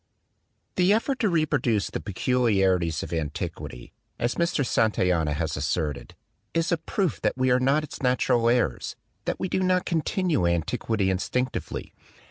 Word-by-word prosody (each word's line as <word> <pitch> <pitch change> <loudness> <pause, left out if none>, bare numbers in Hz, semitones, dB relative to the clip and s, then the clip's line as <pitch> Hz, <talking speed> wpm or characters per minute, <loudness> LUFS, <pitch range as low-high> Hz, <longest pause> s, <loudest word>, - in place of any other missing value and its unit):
"The 180 +1 +4
effort 255 +5 0
to 220 - +2
reproduce 150 - +1
the - - -3
peculiarities 95 - +1
of - - -6
antiquity," 80 -5 -5 0.2
as 120 +1 0
Mr. 170 -5 0
Santayana 90 -10 +2
has 80 -1 -2
asserted, 75 0 -2 0.4
"is 165 +1 +1
a 170 - +3
proof 185 +1 -2
that - - 0
we 130 0 +2
are 125 - +4
not 135 +4 +2
its 155 - -8
natural 125 -2 +2
heirs, 120 - 0 0.3
that - - -2
we - - -1
do 185 - 0
not 185 -1 +2
continue 165 - +1
antiquity 95 +4 0
instinctively. 125 +7 -2
120 Hz, 145 wpm, -26 LUFS, -, 0.4 s, The